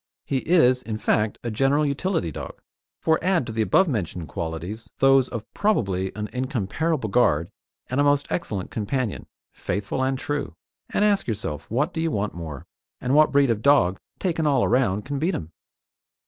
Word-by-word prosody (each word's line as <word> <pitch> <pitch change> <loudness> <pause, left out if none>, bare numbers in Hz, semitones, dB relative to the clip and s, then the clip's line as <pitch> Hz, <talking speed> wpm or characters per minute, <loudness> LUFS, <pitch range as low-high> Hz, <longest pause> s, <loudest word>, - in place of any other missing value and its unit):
He 135 - 0
is, 130 -4 +4
in 110 -3 -4
fact, 110 0 +1
a 120 - -2
general 135 +6 +2
utility 140 - -1
dog, - - -8 0.4
for 160 0 +2
add 180 -6 +2
to - - -5
the 110 - 0
above 190 - +4
mentioned 90 - -3
qualities 85 +9 -5
those 135 -1 +4
of 115 -2 -5
probably 95 - 0
an 105 0 -3
incomparable 130 - -1
guard 90 -8 +2 0.4
and 130 +3 0
a - - +4
most 145 0 +3
excellent 100 - -3
companion, 115 +1 -2 0.3
faithful 100 +7 -3
and 135 0 0
true, 145 - -3 0.3
and 210 - +2
ask 205 -2 +2
yourself 100 - -4
what 135 +8 0
do 160 - -2
you 165 - +1
want 105 -8 -2
more, 80 -2 -7 0.3
and 125 +1 -1
what 155 +1 +5
breed 140 -3 +4
of 110 -2 -1
dog, 130 -10 +4 0.2
taken 165 -4 0
all 135 -4 +3
round, 110 -5 +1
can 140 0 -3
beat 170 +4 0
him? 80 0 -6
125 Hz, 175 wpm, -24 LUFS, 100-145 Hz, 0.4 s, what